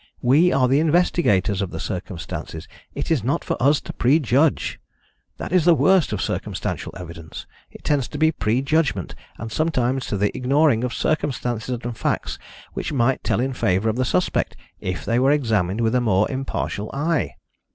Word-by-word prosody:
We 150 +9 +5
are 130 -2 +3
the 135 +3 +3
investigators 150 - +2
of 100 - -2
the - - -6
circumstances: 85 -3 -6 0.3
it - - -3
is 145 -10 +2
not 130 +5 0
for - - -1
us 145 +4 +4
to - - -8
prejudge. 140 +2 +2 0.6
That - - -6
is 180 -2 +4
the 170 0 +6
worst 185 -1 +3
of - - -2
circumstantial - - -3
evidence: 85 -2 -9 0.2
it - - -15
tends 140 -5 +1
to 160 0 +1
prejudgment, 130 - 0 0.2
and 115 +1 -7
sometimes 130 -4 0
to 100 - -2
the 100 +1 0
ignoring 135 -2 +2
of 125 - -1
circumstances 125 -5 -1
and 120 0 -4
facts - - -2 0.3
which - - -4
might 130 -2 +1
tell - - 0
in 130 +2 -1
favour 110 -2 +1
of 110 - -1
the 130 - +1
suspect, 90 -7 0 0.2
if 90 -1 -4
they 115 +1 +1
were 130 +2 +3
examined 110 -8 +1
with 110 0 +1
a 125 - +3
more 105 -3 +2
impartial 130 -5 -3
eye. 145 - 0
125 Hz, 170 wpm, -22 LUFS, 105-145 Hz, 0.6 s, the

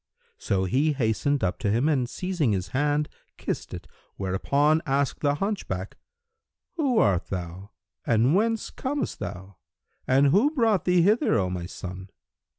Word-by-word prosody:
So 95 -1 0
he 135 - +1
hastened 135 +3 0
up 90 - -1
to 105 - -1
him 120 +8 +2
and 130 -6 +1
seizing 175 - -1
his 95 -1 -2
hand 145 +4 +1 0.3
kissed - - -4
it; - - -7 0.3
whereupon 140 +12 +1
asked 140 0 0
the 145 -1 +1
hunchback, 145 - -3 0.8
"Who 275 -7 +1
art 95 - +2
thou 90 +1 -6 0.3
and 120 +4 +3
whence 225 +3 +1
comest 280 +2 -3
thou 95 +1 -7 0.5
and 135 +2 +4
who 205 - +4
brought 225 -7 +2
thee 180 -1 +4
hither, 210 +6 +3
O 95 -2 0
my 90 -1 -4
son?" 95 0 -8
135 Hz, 150 wpm, -26 LUFS, -, 0.8 s, and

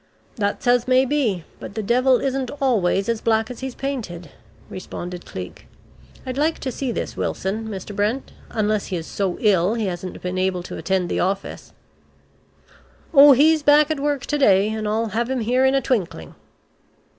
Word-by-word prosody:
"That's 205 -4 -2
as 245 0 +3
may 260 +1 +4
be. 245 - 0 0.2
But 200 - -9
the 220 - -3
devil 255 +4 +3
isn't 265 -2 -2
always 200 -7 +1
as 230 -2 -1
black 220 0 +1
as 245 - -8
he 265 - -4
is 260 - -8
painted," 210 - -5 0.4
responded 180 -1 -7
Cleek. 90 -1 -8 0.6
"I'd 255 +1 -4
like 315 +2 +1
to 260 - -3
see 260 0 -3
this - - -4
Wilson, 215 +4 -3
Mr. 205 -1 -7
Brent, 215 +6 -1 0.2
unless 215 -1 -1
he 190 - -3
is 165 -2 -4
so 190 -1 -2
ill 200 -1 +3
he 225 -2 -1
hasn't 180 -1 -5
been 180 +1 -2
able 185 -1 0
to - - -7
attend 190 -2 0
the - - -2
office." 195 +2 -3 1.4
"Oh 285 -1 +9
he's 310 +4 +4
back 295 +1 +5
at 310 - -1
work 285 -2 -1
to 295 - -1
day, 200 -5 +4
and 220 -1 -3
I'll 220 +2 0
have 235 +3 -1
him 260 -2 -1
here 250 +4 +2
in 265 +1 +3
a 270 - +2
twinkling." 190 - -2
220 Hz, 185 wpm, -22 LUFS, 190-265 Hz, 1.4 s, Oh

